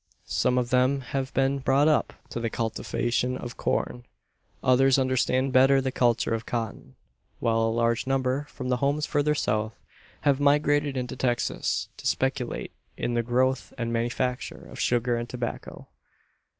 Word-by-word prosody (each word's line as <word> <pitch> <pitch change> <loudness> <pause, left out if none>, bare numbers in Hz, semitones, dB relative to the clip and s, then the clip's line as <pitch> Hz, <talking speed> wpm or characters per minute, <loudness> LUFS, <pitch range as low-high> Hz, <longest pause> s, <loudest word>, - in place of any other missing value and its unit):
Some 125 0 +1
of 125 -1 0
them 130 +2 +3
have 130 +1 -3
been 135 +1 +2
brought 135 +2 +3
up 155 - +2 0.2
to - - -4
the 115 -1 -1
cultivation 120 +2 -1
of 120 -1 -7
corn; 120 - -1 0.6
others 130 +1 +5
understand 130 0 +1
better 135 +1 +6
the 130 0 -1
culture 120 -2 +2
of 115 0 -2
cotton; 115 - -5 0.4
while 115 -1 +1
a 115 - +2
large 115 +1 +1
number, 135 +2 0
from 130 -1 -5
homes 140 +4 +1
further 150 +1 +1
south, 110 -4 -1 0.4
have 140 -2 +2
migrated 145 -1 +2
into 125 -1 -3
Texas 120 -2 -1
to - - -4
speculate - - -1 0.3
in 120 - -2
the 120 - +2
growth 130 +3 0
and 115 -2 -2
manufacture 120 +2 -2
of - - -9
sugar 120 0 +1
and 120 +1 -4
tobacco. 120 -2 -6
125 Hz, 150 wpm, -26 LUFS, 120-135 Hz, 0.6 s, better